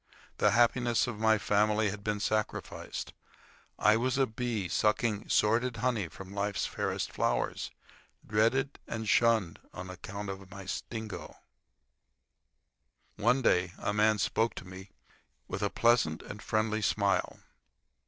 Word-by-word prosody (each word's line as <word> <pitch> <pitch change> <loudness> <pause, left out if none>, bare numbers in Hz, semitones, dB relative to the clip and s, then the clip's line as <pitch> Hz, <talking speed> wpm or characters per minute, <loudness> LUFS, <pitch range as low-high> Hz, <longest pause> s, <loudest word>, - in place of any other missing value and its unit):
The 105 - +5
happiness 120 -1 +3
of 115 -4 -5
my 110 0 +4
family 105 0 +2
had 100 0 -8
been 105 0 -1
sacrificed. 110 +1 -3 0.6
I 105 +1 +5
was 130 +3 0
a 135 - +4
bee, 110 -4 -3
sucking 105 +3 +1
sordid 115 +3 +2
honey 115 -5 0
from 95 +5 -11
life's 100 0 -1
fairest - - -2
flowers, - - -1 0.6
dreaded 115 +6 +1
and 110 -1 -4
shunned 110 -6 +3 0.2
on 95 +1 -6
account 100 +2 -7
of 95 -1 -9
my 100 0 -9
sting. 110 +3 -5 2.1
One 130 +1 +2
day 90 -4 +3
a 100 - -2
man 105 +1 +3
spoke 105 +3 +1
to - - -7
me, 95 +1 -10 0.6
with 100 - -4
a 100 - +1
pleasant 115 -11 +2
and 105 0 -8
friendly 110 0 0
smile. 100 -2 +1
105 Hz, 135 wpm, -30 LUFS, 100-115 Hz, 2.1 s, The